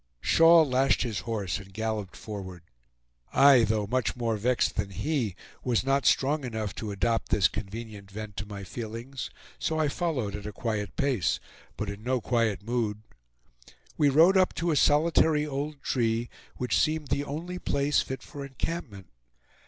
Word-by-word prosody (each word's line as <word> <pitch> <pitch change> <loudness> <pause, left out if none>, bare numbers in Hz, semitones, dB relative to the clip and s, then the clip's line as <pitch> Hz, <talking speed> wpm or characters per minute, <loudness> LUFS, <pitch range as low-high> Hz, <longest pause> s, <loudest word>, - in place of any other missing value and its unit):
Shaw 165 0 +6
lashed 135 -2 +2
his 115 -5 -2
horse 105 -6 -2
and 95 0 -12
galloped 110 -2 -3
forward, 95 -5 -7 0.7
I, 135 -3 +7
though 110 -1 0
much 125 +3 0
more 115 -2 -1
vexed 120 +4 +1
than 100 - -1
he, 120 - -1 0.3
was 120 -3 +1
not 135 +1 +2
strong 145 +2 +2
enough 110 -5 -3
to 110 - -4
adopt 115 +3 0
this 100 -2 +4
convenient 105 -1 -7
vent 105 0 -7
to 105 - -4
my 100 -1 -7
feelings; 115 +6 -6 0.3
so 160 - -1
I 155 -2 +2
followed 140 - -2
at 105 0 -6
a - - -4
quiet 105 -2 -3
pace, 130 - +1 0.4
but 105 - -3
in 100 0 -6
no 125 +2 0
quiet 115 -4 0
mood. 110 -2 -2 0.9
We 145 - +4
rode 165 +7 +6
up 185 -1 +3
to 170 0 0
a - - +2
solitary 150 +1 +4
old 145 0 -4
tree, 115 -1 0 0.3
which 125 - +1
seemed 155 -2 0
the 140 - 0
only 165 +6 -5
place 140 -1 +1
fit 130 -1 -6
for 140 - -8
encampment. 135 - -5
120 Hz, 165 wpm, -28 LUFS, 105-140 Hz, 0.9 s, I